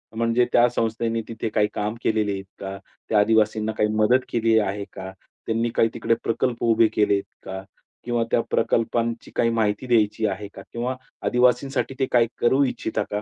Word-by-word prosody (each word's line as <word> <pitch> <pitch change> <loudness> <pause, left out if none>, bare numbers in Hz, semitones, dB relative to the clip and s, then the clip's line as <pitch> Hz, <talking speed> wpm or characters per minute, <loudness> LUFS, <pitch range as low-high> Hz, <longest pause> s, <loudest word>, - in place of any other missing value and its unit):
म्हणजे 115 +1 +2
त्या 120 0 +6
संस्थेने 115 0 -1
तिथे 115 -1 -4
काही 105 -1 +2
काम 105 +2 -2
केलेली 110 -2 +1
आहेत 95 0 -4 0.2
का? 95 0 -6 0.3
त्या 105 - +4
आदिवासींना 110 0 +2
काही 105 - +2
मदत 110 +4 +4
केली 115 -1 +2
आहे 100 0 -2
का? 95 0 -7 0.3
त्यांनी 115 +1 0
काही 115 - +3
तिकडे 115 0 0
प्रकल्प 120 +1 -1
उभे 115 -1 +4
केलेत 100 -2 +2 0.2
का? 95 0 -6 0.4
किंवा 120 -1 0
त्या 115 - +3
प्रकल्पांची 115 0 0
काही 115 - +2
माहिती 110 +1 0
द्यायची 110 -2 +2
आहे 100 +1 -4
का? 95 - -10
किंवा 125 +2 -2 0.3
आदिवासींसाठी 125 +2 +1
ते 130 - +3
काही 120 -2 +4
करू 130 +4 +4
इच्छिता 125 -4 -2
का? 105 - -1
115 Hz, 175 wpm, -23 LUFS, 105-120 Hz, 0.4 s, त्या